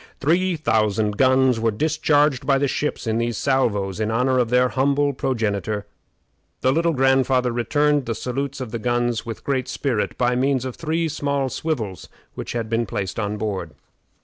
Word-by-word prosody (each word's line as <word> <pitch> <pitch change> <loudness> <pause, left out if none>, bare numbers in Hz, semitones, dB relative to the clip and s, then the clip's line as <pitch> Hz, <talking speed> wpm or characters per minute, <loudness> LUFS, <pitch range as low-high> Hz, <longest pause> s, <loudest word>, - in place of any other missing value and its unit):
Three 175 +5 +2
thousand 110 -7 +1
guns 130 -2 +4
were 115 0 +2
discharged 145 +2 +2
by 140 -1 +4
the 140 +1 +1
ships 150 +1 -2
in 110 0 0
these 115 -2 -1
salvos 105 -8 0
in 110 0 0
honor 125 +3 +2
of 120 -2 +1
their 125 +1 +3
humble 140 +2 +1
progenitor. 110 -5 -2 0.8
The 130 - +3
Little 165 +3 +2
Grandfather 130 -2 +2
returned 145 +4 +1
the 115 - -1
salutes 135 +4 -3
of 125 -4 -5
the 115 - -3
guns 120 0 -1
with 115 - -6
great 130 -2 -1
spirit 120 -7 -2
by 125 0 +2
means 130 0 +1
of 130 - -5
three 165 +1 -1
small 140 -3 -1
swivels 115 - -4 0.2
which - - -6
had 115 -2 -2
been 115 0 0
placed 95 0 -3
on 105 0 -2
board. 95 -7 -4
125 Hz, 175 wpm, -22 LUFS, 110-140 Hz, 0.8 s, guns